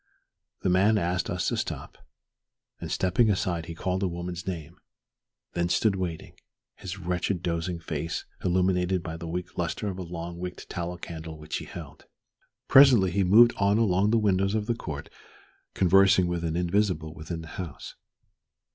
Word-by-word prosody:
The - - +2
man 100 +4 +4
asked 90 -1 -1
us - - -1
to - - -2
stop, - - -4 0.8
and, - - -6
stepping 100 +5 +2
aside, 90 -4 -1
he 85 - -6
called 95 +3 -2
a 95 - +1
woman's 85 0 -5
name, 85 -5 -6 0.7
then 85 0 0
stood 105 +2 +2
waiting, 90 -4 -4 0.4
his 95 +1 -7
wretched 90 0 -2
dozing 85 +1 -1
face 80 -1 -4 0.2
illuminated 90 0 +1
by 80 -2 -5
the 85 0 -7
weak 90 +2 -5
lustre 90 +4 -2
of 95 -1 -6
a - - -3
long 85 0 -6
wicked 90 0 -6
tallow 85 0 -4
candle 80 -2 -7
which 75 0 -4
he - - -7
held. - - -10 0.6
Presently 125 -9 +7
he 100 +2 +2
moved 115 +6 +7
on 100 +1 +3
along 100 -2 +3
the 115 - +3
windows 100 -1 +2
of 105 -1 0
the 120 - +1
court 75 -10 -6 0.7
conversing 95 0 +5
with 85 -1 -2
an 80 -1 -1
invisible 90 -3 0
within 80 +1 -6
the 80 - -10
house. 85 -6 -7
90 Hz, 165 wpm, -27 LUFS, 85-95 Hz, 0.8 s, Presently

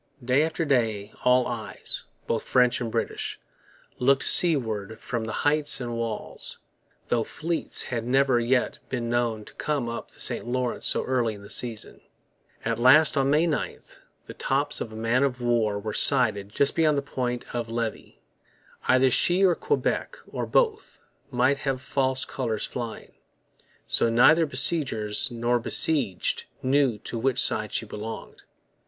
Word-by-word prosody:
Day 130 +3 +3
after 160 +1 -1
day 110 -7 0
all 125 0 +4
eyes, - - -4 0.2
both 115 - -2
French 125 -1 +3
and 115 -2 -3
British, - - -3 0.6
looked 135 +2 +3
seaward 110 - +2
from 120 -2 -4
the 110 - -4
heights 150 0 +2
and 120 -2 -4
walls; 115 -2 -5 0.5
though 120 -2 +2
fleets 165 +7 -2
had 115 -2 -3
never 130 0 +3
yet 125 +2 0
been 120 -2 -3
known 115 -3 -1
to - - -13
come 145 -5 -2
up 115 0 -6
the - - -17
St - - -1
Lawrence 125 0 -1
so - - +1
early 120 -4 0
in 100 - -13
the 100 - -9
season. 115 -3 -2 0.6
At 115 0 -1
last, 150 +7 +6
on 135 -1 +2
May 150 +4 +3
9, 160 -3 -2 0.5
the - - -9
tops 145 +2 -1
of 110 - -4
a - - -10
man 115 +3 +1
of 135 -3 0
war 115 -4 +1
were 105 +1 -5
sighted 100 -1 +2
just 140 +6 +3
beyond 155 -3 +3
the 140 - -1
Point 125 -3 -3
of 120 -2 -3
Levy. 115 -1 -5 0.6
Either 130 0 +4
she 180 +9 +3
or 180 - +5
Quebec, 445 - -1
or - - -3
both, 440 -3 0 0.3
might 130 +2 +2
have 135 -2 -2
false 130 0 -1
colours 115 -5 -3
flying. 120 -3 -6 0.7
So 115 - +2
neither 155 +8 +5
besiegers 130 -7 +1
nor 120 0 0
besieged 120 - +1 0.2
knew 130 -3 +2
to 115 - -4
which 130 +1 0
side 110 -3 +2
she - - -1
belonged. 110 +1 -8
125 Hz, 160 wpm, -26 LUFS, 115-140 Hz, 0.7 s, last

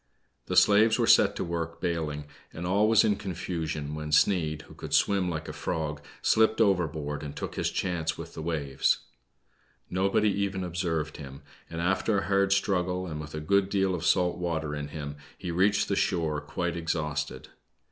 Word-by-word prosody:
The - - -2
slaves 110 +2 +6
were - - +2
set - - +5
to - - -2
work 85 -1 -4
bailing, 80 -4 -2 0.3
and 85 - -6
all 100 +4 +3
was 110 -2 +6
in 105 -2 +2
confusion, 80 -5 -4
when 75 0 -5
Sneid, 80 -2 +2
who - - -15
could - - -3
swim 95 -3 +2
like 80 -2 -4
a - - -5
frog, 75 -2 -3 0.2
slipped 110 0 +3
overboard 80 -8 +1
and 75 -1 -7
took - - -5
his - - -1
chance 85 -3 -2
with - - -8
the - - -6
waves. 75 -4 0 0.9
No 95 +2 +1
body 105 +1 +3
even 100 -1 -1
observed 85 -3 -2
him, 70 -2 -10 0.3
and 85 0 -4
after 95 +4 +1
a 100 - -1
hard 100 0 +2
struggle, 90 -2 +1
and 75 -3 -5
with 75 0 -8
a - - -3
good 100 +5 +2
deal 95 -2 +1
of 90 -2 -3
salt 90 -1 +2
water 80 -4 -2
in 75 -1 -4
him, 75 -1 -6 0.2
he 90 - -5
reached 95 +4 +2
the 100 - 0
shore, 80 -6 0
quite 85 +4 -3
exhausted. 75 -5 -3
85 Hz, 185 wpm, -28 LUFS, 75-95 Hz, 0.9 s, slaves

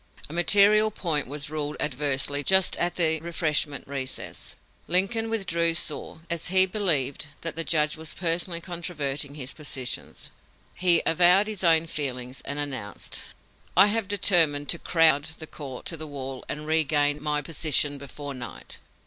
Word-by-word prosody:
A - - -9
material 205 +5 +5
point 165 - -1
was 145 +2 -6
ruled 150 -1 -4
adversely 145 0 0
just 190 +4 +4
at 175 0 -1
the 160 -2 +4
refreshment 155 -3 -1
recess. 135 -2 -5 0.3
Lincoln 195 +6 +2
withdrew 170 -6 0
sore, 160 -1 -3
as 170 -1 -3
he 185 +1 +6
believed 155 -9 0
that 165 - -5
the 165 - -3
judge 155 -2 +1
was 160 -1 -5
personally 170 0 -1
controverting 150 -5 -3
his 130 -3 -6
positions. 135 -4 -5 0.4
He 175 -2 +4
avowed 180 +4 +4
his 210 -3 -5
own 165 -1 +4
feelings, 130 -5 -4
and 140 - -4
announced: 135 -8 -4 0.6
"I - - +9
have 225 -3 -2
determined 170 -8 +3
to 170 - +3
crowd 160 -4 +3
the 160 - -7
court 140 -5 -10
to 165 - -4
the 155 0 -6
wall 135 -2 -7
and 150 +1 -4
regain 150 -2 +1
my 150 -1 -2
position 145 -2 +1
before 140 +1 -8
night." 125 -2 -9
155 Hz, 150 wpm, -25 LUFS, 145-175 Hz, 0.6 s, I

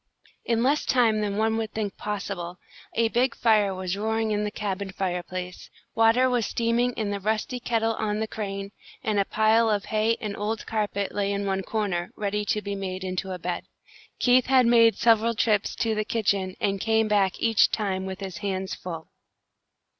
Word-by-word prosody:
In 230 0 +1
less 285 +4 +2
time 225 -4 +3
than 205 -1 -2
one 220 +1 +1
would 220 -1 -3
think 210 -2 -3
possible, 195 -4 -4 0.4
a 230 0 +2
big 245 +2 +1
fire 215 -4 +3
was 185 0 -3
roaring 220 +1 -1
in 210 0 0
the 210 - -1
cabin 200 -2 -4
fireplace, 180 -1 -4 0.2
water 225 +3 +4
was 245 -4 +1
steaming 235 +1 +1
in 215 -3 -2
the 200 - -2
rusty 220 +5 -1
kettle 225 -2 0
on 215 -1 -2
the 220 - -1
crane, 200 -2 -5 0.3
and 215 -2 +1
a 200 - +2
pile 220 +2 +3
of 205 -2 0
hay 220 +1 +1
and 210 -2 -4
old 215 +2 -3
carpet 205 -2 -2
lay 200 -1 0
in 200 0 -2
one 195 -1 0
corner, 190 -4 -2
ready 210 0 -1
to 210 +1 -1
be 200 +1 -3
made 190 -1 -4
into 185 0 -3
a 185 - -3
bed. 175 0 -4 0.5
Keith 250 0 +4
had 260 -1 +5
made 230 -1 +6
several 230 0 +3
trips 210 -2 +1
to 225 -1 0
the 215 0 0
kitchen, 195 -4 0
and 195 -1 0
came 220 0 +2
back 200 -3 +2
each 225 -2 +4
time 190 -3 -2
with 190 +1 -6
his 190 -3 -5
hands 190 -2 -3
full. 165 -3 -7
210 Hz, 190 wpm, -26 LUFS, 195-225 Hz, 0.5 s, made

